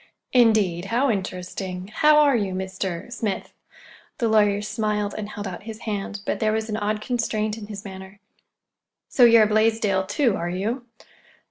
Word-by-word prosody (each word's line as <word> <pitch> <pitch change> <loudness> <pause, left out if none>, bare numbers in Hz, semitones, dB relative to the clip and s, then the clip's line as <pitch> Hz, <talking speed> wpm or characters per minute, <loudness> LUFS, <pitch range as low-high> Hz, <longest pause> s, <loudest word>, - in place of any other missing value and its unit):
"Indeed! 215 -8 +3
How 240 +6 +1
interesting! 185 -1 -5
How 300 0 +5
are 290 -3 +5
you, 200 -5 -1
Mr.—Smith?" 190 +3 -4 0.6
The 235 - +1
lawyer 210 -2 +3
smiled 210 -1 -1
and 210 -1 -5
held 210 -1 -6
out 180 -2 -7
his 220 +1 -8
hand, 205 -1 -4
but - - -1
there 215 -1 +1
was 220 0 -2
an 215 - -2
odd 210 0 -1
constraint 215 -3 -1
in 215 -2 -9
his 205 0 -8
manner. 190 0 -10 0.9
"So 250 - +5
you're 230 -1 +7
a - - +3
Blaisdell, 215 -3 +2
too, 230 +1 +1
are 170 +1 -3
you?" 225 +8 -3
210 Hz, 160 wpm, -24 LUFS, 190-225 Hz, 0.9 s, you're